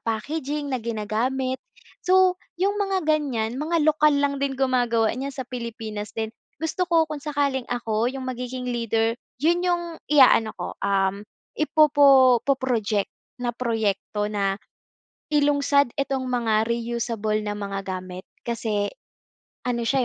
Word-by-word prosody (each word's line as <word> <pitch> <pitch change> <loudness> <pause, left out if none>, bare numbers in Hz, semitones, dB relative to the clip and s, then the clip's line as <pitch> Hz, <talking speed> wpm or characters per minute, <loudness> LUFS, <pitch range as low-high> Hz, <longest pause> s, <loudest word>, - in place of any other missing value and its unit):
packaging 285 +5 -3
na 255 - -1
ginagamit. 235 +4 -2 0.4
So, 370 0 +4 0.2
yung 400 +3 0
mga 385 -3 0
gan'yan 265 -6 0
mga 320 0 +1
lokal 300 -1 +4
lang 280 -1 0
din 275 -1 -1
gumagawa 245 -4 +2
niyan 265 +3 -4
sa 260 - -4
Pilipinas 225 -4 -6
din 220 0 -2 0.2
gusto 325 +4 -2
ko 330 -1 +4
kung 305 -2 -6
sakaling 280 -3 -1
ako 235 -2 0
yung 265 0 -5
magiging 250 0 -4
leader 230 -2 0 0.2
yun 335 +6 +2
yung 350 -1 +1 0.3
iaano 255 -6 +5
ko, - - -5
um, 195 0 +1 0.3
ipopo 280 -5 +5
po 275 +4 +2
project 220 -6 -1 0.2
na 245 -1 -2
proyekto 210 -3 -1
na 195 -1 0 0.7
ilungsad 285 -3 +3
itong 270 -1 -1
mga 225 -3 +1
reusable 230 -2 -1
na 205 - -2
mga 200 -1 -3 0.2
gamit, 185 0 -9 0.2
kasi 220 -3 -1 0.8
ano 240 -1 -1
siya, 260 +2 +2
250 Hz, 135 wpm, -24 LUFS, 225-285 Hz, 0.8 s, iaano